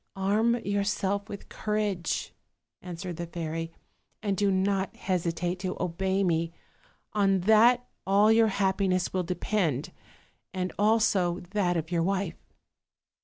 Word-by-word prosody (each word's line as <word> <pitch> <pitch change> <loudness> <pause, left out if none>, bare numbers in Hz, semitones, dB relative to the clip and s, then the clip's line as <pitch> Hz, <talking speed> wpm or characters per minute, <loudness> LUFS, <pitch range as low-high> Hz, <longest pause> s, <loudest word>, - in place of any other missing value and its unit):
"Arm 210 +5 +2
yourself 200 0 -1
with 200 -2 -8
courage," 210 -5 -2 0.5
answered 180 -1 -6
the 170 - -4
fairy, 165 -1 -4 0.5
"and 200 -2 0
do 205 0 +2
not 190 0 0
hesitate 175 -1 -2
to 185 0 -3
obey 190 +2 0
me; 165 -2 +1 0.6
on 195 -3 +2
that 230 +5 +5 0.2
all 205 +3 +5
your 225 0 +5
happi 195 -1 +1
ness 185 -1 0
will 185 - +1
depend, 170 - -1 0.6
as 185 0 -1
also 205 -5 +2
that 185 -4 +1
of 165 +1 -4
your 170 -1 +1
wife." 190 -1 -2
190 Hz, 125 wpm, -28 LUFS, 175-205 Hz, 0.6 s, that